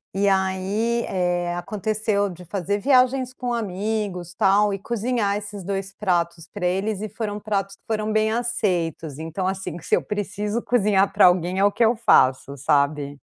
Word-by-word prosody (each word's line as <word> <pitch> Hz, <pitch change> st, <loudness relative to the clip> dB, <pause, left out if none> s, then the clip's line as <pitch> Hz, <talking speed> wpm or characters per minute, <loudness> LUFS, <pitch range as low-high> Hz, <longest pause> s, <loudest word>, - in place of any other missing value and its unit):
e 200 Hz, +1 st, +2 dB
aí, 195 Hz, +5 st, 0 dB
eh, 175 Hz, -1 st, -1 dB
aconteceu 210 Hz, +2 st, -1 dB
de 180 Hz, 0 st, -10 dB
fazer 195 Hz, +3 st, -2 dB
viagens 255 Hz, +1 st, +3 dB
com 245 Hz, -1 st, -3 dB
amigos 200 Hz, -4 st, -3 dB
tal 205 Hz, +2 st, +3 dB
e -, -, -2 dB
cozinhar 220 Hz, -1 st, -1 dB
esses 205 Hz, -1 st, -7 dB
2 195 Hz, +1 st, -3 dB
pratos 170 Hz, -4 st, -1 dB
pra 195 Hz, -4 st, -3 dB
eles 195 Hz, +3 st, -1 dB
e 215 Hz, -, -3 dB
foram 210 Hz, 0 st, -4 dB
pratos 195 Hz, -2 st, -2 dB
que -, -, -45 dB
foram 215 Hz, -1 st, -1 dB
bem 215 Hz, 0 st, +2 dB
aceitos, 175 Hz, -, -1 dB
então 165 Hz, +4 st, -3 dB
assim, 190 Hz, -3 st, -3 dB
que 170 Hz, -, -12 dB
se -, -, +3 dB
eu -, -, 0 dB
preciso 210 Hz, +2 st, -3 dB
cozinhar 205 Hz, -5 st, +2 dB
pra -, -, +7 dB
alguém 180 Hz, +1 st, +1 dB
é -, -, +3 dB
o 205 Hz, -, +5 dB
que 235 Hz, -, +1 dB
eu 230 Hz, +2 st, +3 dB
faço, 140 Hz, -, +3 dB
sabe? 140 Hz, +1 st, +1 dB
200 Hz, 175 wpm, -23 LUFS, 180-215 Hz, -, pra